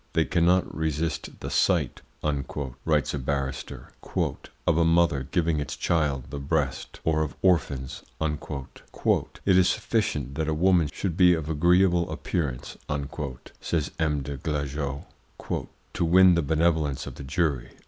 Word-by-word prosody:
"They 80 - +3
cannot 90 +1 +2
resist 80 0 -2
the - - -5
sight," - - +2 0.8
writes 75 -3 +2
a 70 - -2
barrister, 70 0 -3 0.8
"of 85 - +3
a - - +5
mother 80 -5 +3
giving 80 -1 +1
its 75 - -4
child 75 -6 0
the 70 - -4
breast, 70 -1 -2
or 80 -1 +2
of 75 - -2
orphans." 75 -8 +1 0.2
"It 75 -3 -2 0.2
is 95 -2 +5
sufficient 100 - -1
that 80 +2 -1
a 80 - 0
woman 85 -2 +3
should 90 -5 -3
be 90 -1 +6
of 80 -1 -3
agreeable 85 +2 +3
appearance," 70 -8 -3 0.8
says 80 -4 -1
M. 75 -3 +1
des 70 +1 -5
Glajeux, 70 -1 -3 0.9
"to 90 - -1
win 90 +2 +7
the 85 - +2
benevolence 80 -2 +1
of - - -7
the - - -9
jury." 65 -3 0
80 Hz, 140 wpm, -26 LUFS, 70-85 Hz, 0.9 s, win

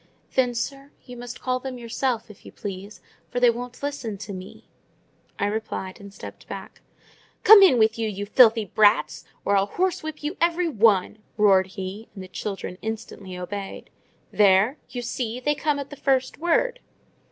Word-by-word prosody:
"Then, 250 -2 +2
sir, 275 +4 -4 0.2
you 250 - -10
must 240 0 -8
call 255 0 0
them 255 -1 -6
yourself, 235 -1 -2
if 205 - -18
you - - -11
please, 200 +1 -8 0.3
for 245 - -2
they 245 -1 +6
won't 245 +3 -8
listen 260 -8 -3
to 200 +1 -7
me," 185 0 -10 0.7
I - - 0
replied, 205 -3 -4
stepping - - -11
back. - - -8 0.6
"Come 435 -1 +10
in 370 -10 +7
with 220 0 +3
you, 225 -1 0
you 205 0 -4
filthy 225 0 +5
brats; 210 +3 +3 0.2
or 200 - +3
I'll 195 0 +3
horsewhip 320 - -2
you 305 +5 -3
every 340 +1 +2
one!" 215 - +3 0.2
roared 195 -3 +5
he; 195 +3 -7
and 190 - -7
the - - -10
children 195 -1 -5
instantly 210 -4 -6
obeyed. 195 +2 -6 0.4
"There, 205 +6 +4
you 245 -1 -5
see!—they 245 +4 -2
come 295 0 0
at 280 0 -6
the - - -7
first 265 -2 0
word!" 475 +10 +1
230 Hz, 165 wpm, -24 LUFS, 200-270 Hz, 0.7 s, Come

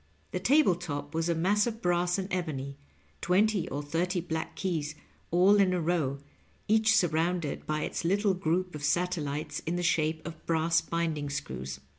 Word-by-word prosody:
The - - -2
table 285 -8 +4
top 150 -4 -5
was 165 +1 0
a 170 - +2
mass 205 +6 +2
of 225 -1 -4
brass 175 -1 +1
and 190 -1 -3
ebony 140 -6 -3 0.2
— - - -35
^twenty 190 0 +2
or 145 +2 -3
thirty 175 +5 -1
black 160 -2 -4
keys 155 -5 -2 0.3
all 185 +4 +5
in 190 -2 +4
a 180 - +1
row, 160 -5 0 0.5
each 220 +1 +4
surrounded 170 -3 0
by 155 0 -1
its - - -3
little 200 +3 +2
group 180 0 -1
of 150 -1 -7
satellites 155 -3 -1
in 170 - 0
the 175 - -2
shape 160 -1 +1
of 165 -2 -8
brass 165 0 +2
binding 160 -4 -2
screws. 65 - -5
170 Hz, 175 wpm, -29 LUFS, 155-180 Hz, 0.5 s, all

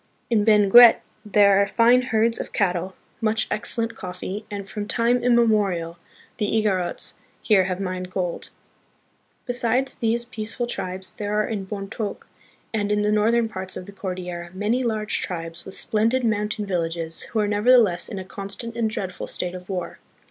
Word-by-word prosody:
In 215 -3 +3
Benguet 220 +2 +7 0.2
there 200 -1 +5
are 200 - +2
fine 240 +4 +4
herds 230 -2 +1
of - - -6
cattle, 185 -1 0 0.3
much 220 0 +1
excellent 230 +2 -2
coffee, 185 +3 -6
and 200 -1 -6
from 210 0 -5
time 240 +2 +1
immemorial 205 -8 +2 0.4
the 210 - +1
Igorots 200 -5 0 0.2
here 195 -4 +4
have 185 0 -3
mined 185 -1 -4
gold. 180 -2 -3 1.0
Besides 245 +1 0
these 235 +1 0
peaceful 230 +1 -4
tribes 185 -5 -4
there 210 -1 -3
are 215 0 +1
in 200 -4 -4
Bontok, 200 +1 -5 0.5
and 210 -2 -1
in 210 0 +2
the 210 - +2
northern 225 +2 +3
parts 190 -3 -6
of 185 - -7
the 200 - -10
Cordillera, 180 -3 -5
many 215 +6 0
large 215 -3 -1
tribes, 165 -1 -6
with 190 - -7
splendid 230 +4 +1
mountain 210 -1 -1
villages, 165 -3 -2
who 220 - -3
are 210 - +2
nevertheless 210 -3 +3
in 200 - -6
a 190 - -6
constant 200 +4 -5
and 230 -2 0
dreadful 190 -4 -5
state 180 0 -3
of 180 +1 -9
war. 185 -2 -4
210 Hz, 165 wpm, -23 LUFS, 185-225 Hz, 1.0 s, Benguet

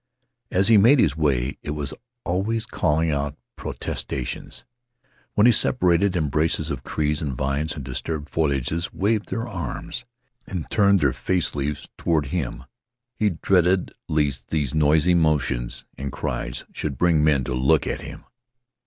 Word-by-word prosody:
As 95 +2 +3
he 110 - +7
made 120 +8 +6
his 75 - +3
way, 70 -4 0
it 75 - -4
was 75 -1 -3 0.3
always 110 +6 0
calling 80 -4 +1
out 70 0 -2 0.2
protestations. 65 -3 -5 0.7
When 105 - +5
he 120 - +8
separated 95 -5 +3
embraces 80 -1 +1
of - - -4
trees 75 -1 -1
and 70 -4 -2
vines 70 +5 -1
the 75 - -5
disturbed 75 +4 -4
foliages 80 +2 0
waved 105 +2 0
their 115 +1 -3
arms 110 +4 -5 0.4
and 90 -5 -4
turned 100 -3 +4
their 70 -3 +3
face 90 +8 0
leaves 75 0 -3
toward 80 -3 +1
him. 60 -8 -2 0.5
He 105 - +1
dreaded 90 +1 +2 0.2
lest 75 -4 0
these 75 -4 -1
noisy 75 +3 +4
motions 65 -7 +1
and 70 0 -4
cries - - -4
should 70 -4 -3
bring 85 -2 +3
men 75 -4 +3
to 65 - -3
look 65 +4 +3
at - - -3
him. - - -9
75 Hz, 150 wpm, -24 LUFS, 70-90 Hz, 0.7 s, he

